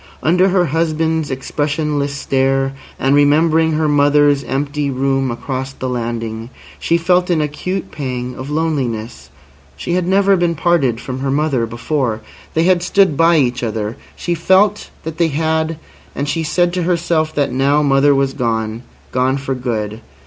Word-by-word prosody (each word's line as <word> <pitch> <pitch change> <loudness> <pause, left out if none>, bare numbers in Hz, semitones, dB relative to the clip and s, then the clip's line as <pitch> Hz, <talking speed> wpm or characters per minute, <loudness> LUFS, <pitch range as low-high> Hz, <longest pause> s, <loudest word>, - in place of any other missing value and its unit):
Under 180 +4 +3
her 180 -1 +2
husband's 160 0 0
expressionless 145 +1 -2
stare, 135 0 0 0.2
and 135 +1 +1
remembering 160 +3 +3
her 155 0 +1
mother's 145 -1 +3
empty 145 +1 -2
room 135 0 0
across 130 +2 -4
the 130 - -5
landing, 115 -2 -4 0.3
she 170 - +1
felt 180 +2 +2
an 170 -3 +2
acute 165 +6 -3
pang 125 -3 -4
of 130 +2 -7
loneliness. 130 - -2 0.5
She 170 - -3
had 180 -1 0
never 195 +1 +4
been 175 -2 +1
parted 150 -8 +1
from 130 +1 -6
her 135 +1 -2
mother 140 -4 0
before. 115 0 -2 0.3
They 160 - +3
had 180 0 +3
stood 185 -3 +3
by 165 +3 +4
each 125 -4 +1
other. 110 -1 -3 0.2
She 175 - -2
felt 190 +5 +2
that 160 +1 -6
they 170 - +4
had, 160 +1 -1 0.4
and 140 - -2
she 165 +3 -1
said 175 +2 +1
to 180 - -1
herself 170 -2 0
that 145 -3 0
now 140 +3 +2
mother 140 0 +4
was 135 0 +1
gone—gone 120 +2 -2
for 135 0 -3
good. 115 -4 -3
145 Hz, 155 wpm, -17 LUFS, 130-165 Hz, 0.5 s, never